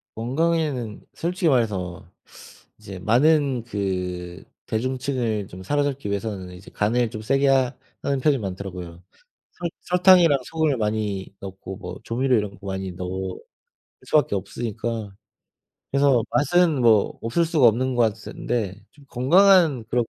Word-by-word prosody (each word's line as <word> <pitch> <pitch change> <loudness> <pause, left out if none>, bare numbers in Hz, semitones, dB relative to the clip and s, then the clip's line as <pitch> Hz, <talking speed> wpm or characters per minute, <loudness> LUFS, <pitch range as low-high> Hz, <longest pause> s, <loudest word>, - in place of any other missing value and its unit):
건강에는 135 -2 -1
솔직히 175 0 0
말해서 100 -9 -1 0.7
이제 95 -2 -9
많은 135 - +3
그 90 -5 -4 0.2
대중층을 125 -3 -2
좀 95 +1 -10
사로잡기 140 0 -1
위해서는 100 -2 -4
이제 90 - -13
간을 115 +3 +1
좀 110 - -7
세게 135 +5 +2
하 130 -1 +3 0.3
하는 140 -1 0
편이 140 +1 +3
많더라고요. 90 -3 -7 0.5
설 175 -1 -4
설탕이랑 180 -4 +5
소금을 160 -3 0
많이 105 -3 -2
넣고 95 0 -8
뭐 90 -3 -8
조미료 125 +2 +1
이런 105 -1 -1
거 100 - -10
많이 95 -1 -4
넣을 95 +1 -5 0.7
수밖에 150 -9 +2
없으니까. 110 +1 -4 0.8
그래서 140 -3 +4
맛은 160 -1 +3
뭐 110 -4 +3
없을 120 +10 +1
수가 155 -7 +4
없는 130 +3 +1
것 120 - +3
같은데 110 -1 -4
좀 145 -2 -20
건강한 160 - +4
그런 120 -1 +1
115 Hz, 290 characters per minute, -23 LUFS, 100-140 Hz, 0.8 s, 설탕이랑